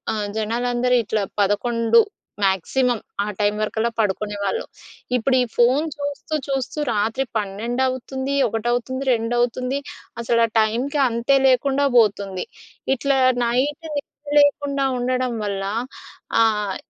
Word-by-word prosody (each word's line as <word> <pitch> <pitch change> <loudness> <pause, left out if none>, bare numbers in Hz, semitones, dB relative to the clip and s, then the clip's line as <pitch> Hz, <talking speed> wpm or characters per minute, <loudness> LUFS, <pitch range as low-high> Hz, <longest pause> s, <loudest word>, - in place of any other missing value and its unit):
ఆహ్, 205 -1 -2
జనాలందరూ 245 +3 +1
ఇట్లా 205 -1 -1 0.2
11 230 +3 +3 0.4
మ్యాక్సిమం 225 +6 +1 0.2
ఆ - - -3
టైం 205 0 +2
వరకల్లా 220 +2 0
పడుకునేవాళ్ళు. 205 - -1 0.5
ఇప్పుడు 255 +2 +2
ఈ - - +3
ఫోన్ 255 +5 +4
చూస్తూ 285 +2 -4
చూస్తూ 270 +2 -3
రాత్రి 220 +5 0
12 215 +5 -2
అవుతుంది, 265 +2 -3
1 225 +2 -3
అవుతుంది, 260 +3 -2
2 230 +1 -1
అవుతుంది. 250 +3 0 0.4
అసలు 230 0 +2
ఆ - - -2
టైమ్‌కి 245 +7 0
అంతే 235 +4 +1
లేకుండా 270 +2 +2
బోతుంది. 200 -4 +2 0.5
ఇట్లా 275 +1 +1 0.3
నైట్ 265 +6 0 0.2
నిద్ర 290 +1 -8
లేకుండా 285 -1 +2
ఉండడం 250 0 -1
వల్ల, 195 -1 -2 0.8
ఆహ్, 210 -3 +1
240 Hz, 120 wpm, -22 LUFS, 215-265 Hz, 0.8 s, ఫోన్